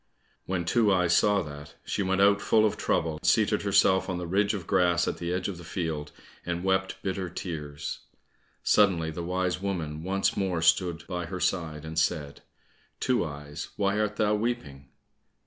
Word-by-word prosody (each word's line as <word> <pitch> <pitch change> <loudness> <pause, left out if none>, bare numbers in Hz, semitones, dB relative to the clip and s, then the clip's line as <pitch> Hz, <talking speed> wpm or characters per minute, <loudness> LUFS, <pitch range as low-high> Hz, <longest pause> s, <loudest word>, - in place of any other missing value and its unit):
When 90 -2 -1
Two 110 +2 +3
eyes 90 -2 +3
saw 105 -2 +3
that, 75 -1 -10
she - - -2
went 95 0 +1
out 100 0 +5
full 110 +1 +4
of 105 - +1
trouble, 80 -2 -1
seated - - +3
herself 95 0 +3
on 90 - -1
the 90 - -4
ridge 100 +4 +1
of 95 -5 -6
grass 90 -2 +2
at - - -2
the 85 0 -3
edge 90 0 -1
of 95 -4 -5
the - - -10
field, 80 -4 -4 0.3
and 85 0 -3
wept 95 0 +1
bitter 95 -1 -2
tears. 75 -5 -5 0.6
Suddenly 85 -6 +3
the 85 +2 -5
wise 90 +1 -1
woman 80 -6 -3
once 95 +3 0
more 90 -4 -1
stood 85 +1 +2
by 90 -2 -4
her 90 +1 -5
side, 80 -5 -1
and 80 0 -2
said, 75 -3 -1 0.6
"Two 125 -6 +1
eyes, 75 0 -6
why 100 +1 +1
art 105 -1 0
thou 105 -1 +2
weeping?" 105 - -3
90 Hz, 180 wpm, -28 LUFS, 80-100 Hz, 0.6 s, out